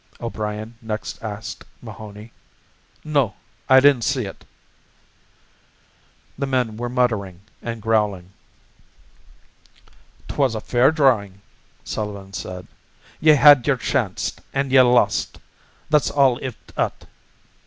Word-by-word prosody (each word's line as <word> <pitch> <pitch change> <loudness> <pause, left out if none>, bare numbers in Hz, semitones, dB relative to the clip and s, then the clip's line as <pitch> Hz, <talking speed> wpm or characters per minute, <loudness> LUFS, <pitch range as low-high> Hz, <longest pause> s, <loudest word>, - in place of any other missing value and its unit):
O'Brien 110 -1 -5
next 110 -2 -5
asked 110 0 -6 0.2
Mahoney. 105 +1 -11 0.7
"No, 140 -8 0 0.3
I 130 0 +8
didn't 140 -2 +5
see 125 +1 0
ut." 95 - -10 1.9
The 140 - -1
men 125 -5 0
were 120 +2 -4
muttering 110 -8 -1 0.2
and 115 -2 -6
growling. 105 -5 0 2.0
"'Twas 135 -5 0
a - - -2
fair 125 +5 +3
drawin'," 120 -11 +1 0.4
Sullivan 100 -2 -6
said. 90 0 -6 0.5
"Ye 155 -1 +6
had 145 -3 +7
yer 140 -3 +3
chanct 120 -6 -2
an' 135 -1 -1
ye 130 -1 +7
lost, 125 -1 +2 0.5
that's 150 -2 +3
all 135 -3 +3
iv 130 -2 -5 0.2
ut." - - -2
115 Hz, 110 wpm, -21 LUFS, 105-135 Hz, 2.0 s, I